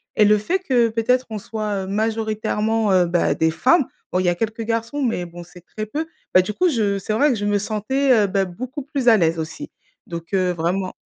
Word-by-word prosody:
et - - +5
le 210 +1 +5
fait 350 - -1
que 250 -9 +2
peut-être 245 +3 +1
on 220 - -4
soit, 210 -1 -3
heu, - - -9
majoritairement, 220 0 0
heu, 180 -1 +4
bah, 175 0 +1
des 160 0 +2
femmes, 245 - +3 0.3
bon, 180 - +2
il 185 - 0
y - - +4
a 175 - +1
quelques 225 +3 -3
garçons, 230 +5 -2
mais 225 -7 -1
bon, 175 0 -10
c'est 180 +1 -15
très 215 - -3
peu. 300 +9 -4 0.3
Bah, 185 - +7
du 210 +3 -4
coup, 360 - +2
je 210 -8 0
c'est 215 - -3
vrai 285 +7 +3
que 255 - +1
je 205 -1 -3
me 205 0 +2
sentais, 230 +7 0
heu, - - -1
bah, 195 0 +1
beaucoup 250 +10 -6
plus 275 -3 -3
à 225 - +7
l'aise 165 -3 +1
aussi. 160 0 -6 0.4
Donc, 170 +1 -8
heu, 185 -2 +2
vraiment 180 +3 -2
215 Hz, 240 wpm, -21 LUFS, 185-230 Hz, 0.4 s, Bah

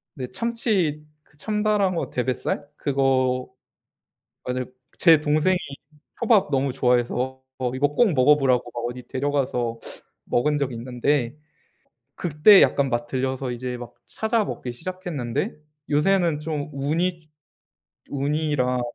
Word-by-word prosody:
네. 130 -3 -5
참치 200 - -1 0.2
그 150 - -29
참다랑어 210 -2 0
대뱃살 130 +3 -2
그거 130 -3 +1 1.0
맞을 125 0 -3 0.2
제 165 -3 +6
동생이 155 +5 +2 0.6
초밥 220 -9 +3
너무 135 0 +1
좋아해서 125 +1 0 0.3
이거 140 +2 +2
꼭 190 +5 +3
먹어보라고 130 -3 +3
막 120 - -4
어디 125 0 -8
데려가서 130 -4 -1 0.5
먹은 150 +5 +1
적이 135 -4 -2
있는데 125 +2 -1 0.8
그때 175 +5 +6
약간 140 -1 +2
맛 120 0 -1
들려서 130 +1 -2
이제 125 +1 -4
막 120 -1 -9
찾아 220 0 0
먹기 125 -10 -5
시작했는데 150 -5 -4 0.3
요새는 165 +1 +2
좀 150 -2 -3
우니, 160 +4 -1 0.8
우니랑 140 -3 0
140 Hz, 245 characters per minute, -24 LUFS, 125-165 Hz, 1.0 s, 제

